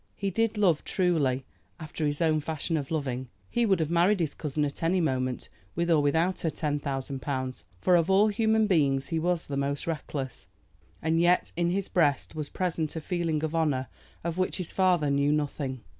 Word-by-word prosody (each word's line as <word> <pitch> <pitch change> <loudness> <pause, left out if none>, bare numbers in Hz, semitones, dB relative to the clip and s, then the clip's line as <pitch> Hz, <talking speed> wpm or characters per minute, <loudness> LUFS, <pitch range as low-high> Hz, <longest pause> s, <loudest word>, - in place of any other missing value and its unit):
He 195 -1 -2
did 225 +2 0
love 180 -7 +3
truly, 145 -8 +1 0.3
after 155 -1 -3
his 145 +1 -2
own 155 -2 +3
fashion 160 +2 -3
of 145 -4 -2
loving. 130 -5 -2 0.2
He 240 -1 +2
would 190 -3 +3
have 160 0 -1
married 180 +4 +3
his 160 -4 -1
cousin 150 -1 -2
at 140 - -5
any 170 +3 +2
moment, 130 -6 -1 0.3
with 170 +1 0
or 155 -3 +5
without 160 +6 +1
her 165 - 0
ten 150 -1 -2
thousand 135 -1 -4
pounds, 130 -2 -3 0.2
for 180 - +4
of 170 +1 +3
all 195 +3 +5
human 220 +1 +2
beings 140 -8 +2
he 165 -2 0
was 175 0 0
the 140 - -4
most 140 +1 -1
reckless. 145 -5 -4 0.6
And 160 +1 +2
yet 175 +1 +3
in 175 0 +1
his 195 +2 -1
breast 145 -7 +1
was 155 -2 -4
present 165 -4 -2
a - - -2
feeling 165 -2 -1
of 160 0 -2
honor 145 -7 0 0.3
of 170 +1 -3
which 185 - 0
his 180 -3 -5
father 180 -6 +2
knew 140 +1 +2
nothing. 145 -3 -2
160 Hz, 200 wpm, -28 LUFS, 140-175 Hz, 0.6 s, or